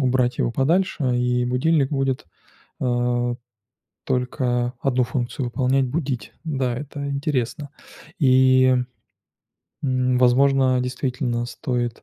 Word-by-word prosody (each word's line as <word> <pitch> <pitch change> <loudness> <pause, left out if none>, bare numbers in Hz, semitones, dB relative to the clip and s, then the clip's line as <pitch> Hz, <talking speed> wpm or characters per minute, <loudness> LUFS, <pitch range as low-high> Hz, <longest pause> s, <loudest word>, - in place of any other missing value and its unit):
убрать 125 -1 +1
его 120 - 0
подальше, 145 -1 +1
и 125 0 +1
будильник 135 +3 +1
будет, 135 - -1 0.6
а, 120 -1 0 0.7
только 125 -1 -1
1 130 -2 +2
функцию 125 +1 -3
выполнять- 130 +2 +1
будить. 130 -6 -3
Да, 130 -6 -1
это 140 +1 -6
интересно. 140 0 -2 0.5
И, 130 -2 +5 1.1
м, 130 -2 +1
возможно, 130 +1 +4
действительно 125 -1 -2
стоит, 120 -1 -3
130 Hz, 100 wpm, -22 LUFS, 125-135 Hz, 1.1 s, И